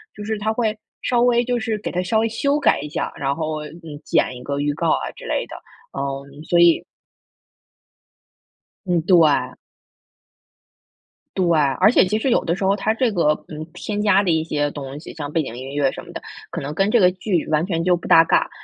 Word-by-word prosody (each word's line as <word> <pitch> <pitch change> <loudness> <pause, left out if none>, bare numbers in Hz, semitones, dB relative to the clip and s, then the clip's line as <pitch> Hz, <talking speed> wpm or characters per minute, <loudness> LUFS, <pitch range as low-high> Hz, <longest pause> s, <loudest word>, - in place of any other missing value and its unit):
就 210 - -8
是 220 -1 -2
他 215 +2 0
会 220 -2 0 0.3
稍 240 -1 +2
微 240 0 +3
就 245 0 -1
是 220 -1 -2
给 210 - -5
它 180 - -1
稍 220 +4 +1
微 225 - +2
修 280 +6 0
改 - - +3
一 150 - -6
下， 160 - -3
然 140 0 -1
后， 155 -1 -3
嗯， 160 -2 -10
剪 125 - +1
一 125 - -10
个 140 0 -3
预 145 0 0
告 - - -1
啊 65 -2 -1
之 - - -11
类 - - -1
的， - - -9 0.4
嗯， 140 +1 -5
所 175 - +2
以 170 -1 +5 2.0
嗯， 175 -3 +1
对。 155 -8 +4 1.8
对， 185 - +1 0.4
而 200 +4 +6
且 200 - +5
其 210 +4 0
实 265 - 0
有 - - +2
的 170 +1 0
时 195 - -5
候 195 +1 +3
它 215 +2 0
这 240 +1 +1
个， 170 -6 +1 0.2
嗯， 155 0 -7
添 210 -1 -4
加 205 -1 +4
的 190 - -1
一 160 0 +1
些 145 -2 -1
东 140 0 -7
西， - - -10
像 145 -2 -6
背 165 - +1
景 120 -5 -6
音 135 +2 -7
乐 140 -2 +2
什 - - -8
么 - - -12
的， - - -7 0.3
可 - - -5
能 145 +2 -5
跟 195 +5 +1
这 240 - +4
个 180 -2 +6
剧 185 -2 -2
完 155 +2 +1
全 165 -3 -1
就 180 0 +3
不 170 - -8
搭 165 - +7
嘎。 - - +2
170 Hz, 235 characters per minute, -21 LUFS, 145-210 Hz, 2.0 s, 搭